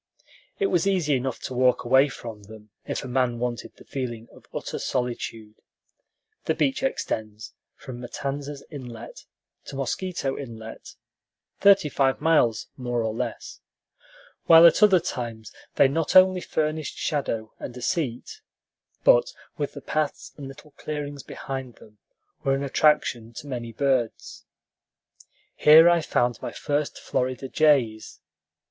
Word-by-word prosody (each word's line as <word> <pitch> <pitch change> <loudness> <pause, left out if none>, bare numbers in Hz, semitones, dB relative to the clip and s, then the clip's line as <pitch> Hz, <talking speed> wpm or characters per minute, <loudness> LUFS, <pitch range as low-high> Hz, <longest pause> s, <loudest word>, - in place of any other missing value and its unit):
It 405 - 0
was 175 +3 +2
easy 180 -7 +1
enough 130 -1 -3
to - - -5
walk 125 0 +2
away 130 +4 +5
from 115 -4 -9
them, 105 0 -14 0.2
if - - -3
a - - -6
man 125 -1 0
wanted 120 0 -4
the - - -16
feeling 120 -4 -5
of - - -18
utter - - -5
solitude 115 -3 -4 0.8
(the - - +1
beach 270 -1 0
extends 110 - -3 0.2
from 125 -2 -9
Matanzas 140 +3 -5
Inlet 125 -6 -9 0.4
to - - -8
Mosquito 135 +1 -2
Inlet, 115 -4 -9 0.6
thirty 200 -5 +6
five 135 -2 +1
miles, 150 -8 +2
more 120 -2 -2
or 110 -1 -2
less); 115 - -5 0.9
while 165 0 +9
at 170 - +6
other 200 -4 +7
times 115 - -5 0.2
they - - +6
not 155 +3 -1
only 185 0 +7
furnished 155 -2 -2
shadow 115 -7 -2
and 125 - -7
a - - -8
seat, 165 - -3 0.6
but, - - +5 0.3
with 145 - -2
the 145 - -9
paths 150 +1 -2
and 140 -2 -8
little 135 +2 -13
clearings 145 -2 -5
behind 130 -3 -7
them, 105 -1 -19 0.4
were 135 0 +2
an 135 - -3
attraction 130 -5 +1
to 130 - -9
many 120 -4 -5
birds. 120 - -1 1.1
Here 160 +2 +8
I 175 -1 +4
found 120 -5 0
my - - -4
first 145 0 -2
Florida 130 +1 -2
jays. 130 -8 +1
135 Hz, 140 wpm, -25 LUFS, 120-150 Hz, 1.1 s, while